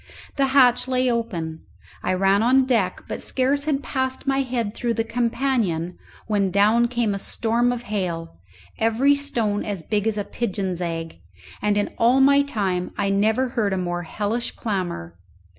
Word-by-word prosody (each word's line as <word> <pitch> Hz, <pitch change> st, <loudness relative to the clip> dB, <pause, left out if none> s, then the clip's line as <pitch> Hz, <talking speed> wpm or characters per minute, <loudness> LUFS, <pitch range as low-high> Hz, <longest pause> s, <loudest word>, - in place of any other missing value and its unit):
The 275 Hz, -1 st, +2 dB
hatch 255 Hz, -2 st, +4 dB
lay 255 Hz, -1 st, +1 dB
open; 170 Hz, -9 st, -3 dB, 0.4 s
I -, -, 0 dB
ran 195 Hz, +2 st, +3 dB
on 260 Hz, +3 st, +4 dB
deck, 225 Hz, -8 st, 0 dB
but -, -, -4 dB
scarce 275 Hz, +2 st, 0 dB
had 290 Hz, -2 st, 0 dB
passed 260 Hz, -1 st, -2 dB
my 270 Hz, 0 st, +1 dB
head 240 Hz, -5 st, -2 dB
through 235 Hz, 0 st, -2 dB
the 225 Hz, -, 0 dB
companion 230 Hz, -8 st, -1 dB, 0.3 s
when 205 Hz, -3 st, +1 dB
down 215 Hz, +5 st, +4 dB
came 235 Hz, -3 st, 0 dB
a 200 Hz, -, -3 dB
storm 235 Hz, +4 st, 0 dB
of 245 Hz, -1 st, -4 dB
hail, 175 Hz, -, -4 dB, 0.4 s
every 230 Hz, +6 st, +3 dB
stone 235 Hz, -8 st, -1 dB
as 200 Hz, -6 st, -4 dB
big 210 Hz, +4 st, -1 dB
as 220 Hz, -1 st, 0 dB
a 205 Hz, -, -1 dB
pigeon's 195 Hz, -5 st, -3 dB
egg, 165 Hz, -, -4 dB, 0.4 s
and 205 Hz, 0 st, +1 dB
in 205 Hz, -, 0 dB
all 240 Hz, +3 st, +4 dB
my 280 Hz, +1 st, +6 dB
time 195 Hz, -10 st, -1 dB
I 200 Hz, -1 st, 0 dB
never 220 Hz, +6 st, +2 dB
heard 220 Hz, -5 st, 0 dB
a -, -, 0 dB
more 175 Hz, -1 st, -2 dB
hellish 210 Hz, +7 st, -3 dB
clamour. 175 Hz, -, -4 dB
220 Hz, 170 wpm, -23 LUFS, 195-250 Hz, 0.4 s, my